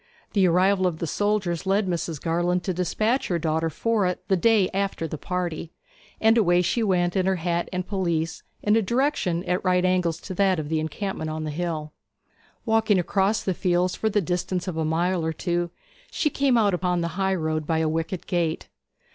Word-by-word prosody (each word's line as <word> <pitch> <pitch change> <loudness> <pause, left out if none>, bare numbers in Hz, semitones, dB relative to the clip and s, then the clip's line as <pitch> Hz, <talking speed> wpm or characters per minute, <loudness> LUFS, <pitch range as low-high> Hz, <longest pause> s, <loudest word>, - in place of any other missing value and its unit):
The 195 -3 +4
arrival 185 +2 +3
of 170 -3 -2
the 170 - -3
soldiers 190 -1 -1
led 200 +2 +2
Mrs. 170 -3 -2
Garland 175 +3 0
to 185 - -1
despatch 215 +8 0
her 175 - 0
daughter 160 0 0
for 215 +4 0
it 180 - -4
the 190 - +4
day 210 0 +4
after 195 -4 -1
the 155 -1 -6
party; 175 -2 -3 0.5
and 225 +1 +4
away 175 -3 +3
she 235 - 0
went 180 -4 +1
in 190 -1 +1
her 190 - +2
hat 170 0 -1
and 185 -1 -3
pelisse, 170 -5 -1 0.2
in 210 +1 +3
a 225 - +4
direction 230 - 0
at 180 -1 -1
right 180 -1 +2
angles 180 -3 +1
to - - -6
that 190 0 +2
of 150 -2 -4
the 160 -1 +1
encampment 160 +1 -3
on 155 0 -4
the 155 - -3
hill. 155 -2 -3 0.7
Walking 220 -3 +3
across 195 +4 +1
the 190 - 0
fields 180 0 +1
for 220 - -1
the 205 -1 +1
distance 180 +1 -2
of 180 - -3
a 160 - -1
mile 170 +3 0
or 160 0 -1
two, 175 +1 -1 0.4
she 300 - 0
came 270 -3 +2
out 205 -4 +3
upon 180 -1 0
the 170 - -1
high 190 +2 0
road 155 -3 -2
by 160 - +1
a 160 0 +1
wicket 165 +3 -2
gate. 170 -3 -1
180 Hz, 205 wpm, -25 LUFS, 165-195 Hz, 0.7 s, The